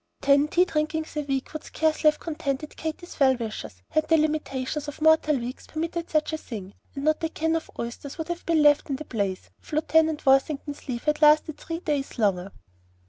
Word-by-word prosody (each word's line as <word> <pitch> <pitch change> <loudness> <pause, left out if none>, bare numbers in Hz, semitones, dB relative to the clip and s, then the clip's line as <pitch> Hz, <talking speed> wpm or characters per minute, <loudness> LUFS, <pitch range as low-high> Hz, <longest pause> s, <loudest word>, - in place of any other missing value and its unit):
Ten 280 +1 +4
tea 355 +4 +3
drinkings 310 -1 -2
a 300 - 0
week 275 -1 -3
would 310 - -5
scarcely 315 -1 +2
have 300 - -3
contented 300 -2 -4
Katy's 320 +2 -6
well 265 -2 +5
wishers, 215 - -6
had 310 0 +1
the 325 - +5
limitations 300 -2 -1
of 290 - -7
mortal 315 -1 +4
weeks 245 +1 -6
permitted 330 +1 -3
such 310 0 +1
a 315 - -2
thing; 200 -8 -8 0.2
and 275 - -4
not 310 +1 +1
a 325 - +1
can 320 0 0
of 325 - -3
oysters 235 +4 -6
would 320 0 -5
have 345 0 -4
been 325 -2 +3
left 295 0 +4
in 275 - 0
the 305 +3 -7
place 200 -7 -3
if - - -16
Lieutenant 315 0 +2
Worthington's 280 +2 +1
leave 240 -2 -3
had 300 0 0
lasted 305 0 +5
three 330 +1 -5
days 290 -6 -2
longer. 195 -4 +1
300 Hz, 200 wpm, -26 LUFS, 270-315 Hz, 0.2 s, well